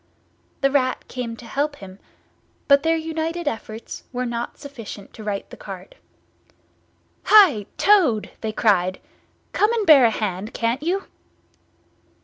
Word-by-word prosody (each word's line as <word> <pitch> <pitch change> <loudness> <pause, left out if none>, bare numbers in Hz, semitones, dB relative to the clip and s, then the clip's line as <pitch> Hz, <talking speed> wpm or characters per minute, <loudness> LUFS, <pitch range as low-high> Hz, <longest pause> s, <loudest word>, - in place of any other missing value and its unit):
The 275 - +3
Rat 255 -2 0
came 235 -3 -5
to 240 - -12
help 285 +5 -2
him, 195 -5 -12 0.7
but 280 -1 +6
their 325 +2 +2
united 325 +1 -3
efforts 225 -3 -5
were 250 0 -2
not 235 0 -4
sufficient 235 -8 -10
to 220 - -10
right 205 -2 -3
the - - -10
cart. 190 -2 -9 1.3
"Hi! 345 - +6
Toad!" 325 - +3
they 220 - -2
cried. 190 -4 +1 0.5
"Come 420 +2 +3
and 450 -3 0
bear 285 -7 +8
a - - +5
hand, 210 -1 -4
can't 235 +4 -1
you!" 370 +5 -1
245 Hz, 135 wpm, -22 LUFS, 215-315 Hz, 1.3 s, bear